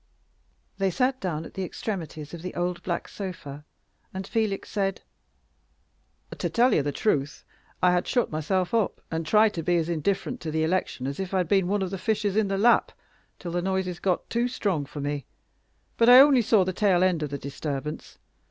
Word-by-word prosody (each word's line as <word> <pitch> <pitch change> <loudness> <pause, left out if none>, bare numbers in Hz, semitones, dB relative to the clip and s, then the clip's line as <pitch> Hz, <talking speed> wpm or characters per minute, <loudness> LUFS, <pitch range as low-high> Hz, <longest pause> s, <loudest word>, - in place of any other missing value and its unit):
They 195 0 +2
sat 260 +6 0
down 165 -4 -3
at - - -11
the 190 - -3
extremities 165 -6 -5
of 170 - -7
the 180 +1 -6
old 175 0 -2
black 175 -2 -3
sofa, 150 -7 -7 0.5
and 190 0 -5
Felix 215 -2 -1
said 195 -2 -1 1.3
"To - - -2
tell 245 +2 +3
you - - +3
the 145 +1 -2
truth, 145 -6 -1 0.4
I 180 - +6
had 180 0 +1
shut 245 -2 +1
myself 175 +5 -1
up, 225 -3 +1
and 160 -1 -3
tried 215 +4 +4
to 165 - -3
be 175 +2 +1
as 165 0 -1
indifferent 195 - -1
to 160 - -4
the 160 0 0
election 160 -6 -1
as 140 +1 -4
if 190 0 -3
I'd 180 -2 +1
been 190 0 +2
one 200 +1 0
of 185 - -4
the 195 - -4
fishes 210 0 0
in 215 -1 +2
the 195 0 -1
Lapp, 235 +4 +4 0.5
till 175 - -6
the 175 +1 -1
noises 190 -1 -2
got 185 -3 -1
too 235 +1 0
strong 195 - -1
for 145 0 -7
me. 145 -2 -3 0.7
But 230 +1 +5
I 250 +1 +10
only 275 -2 +7
saw 220 -3 +4
the 185 0 -2
tail 185 -3 +3
end 180 -4 +2
of 150 - -2
the 140 - -4
disturbance. 140 +1 -5
185 Hz, 200 wpm, -26 LUFS, 160-205 Hz, 1.3 s, I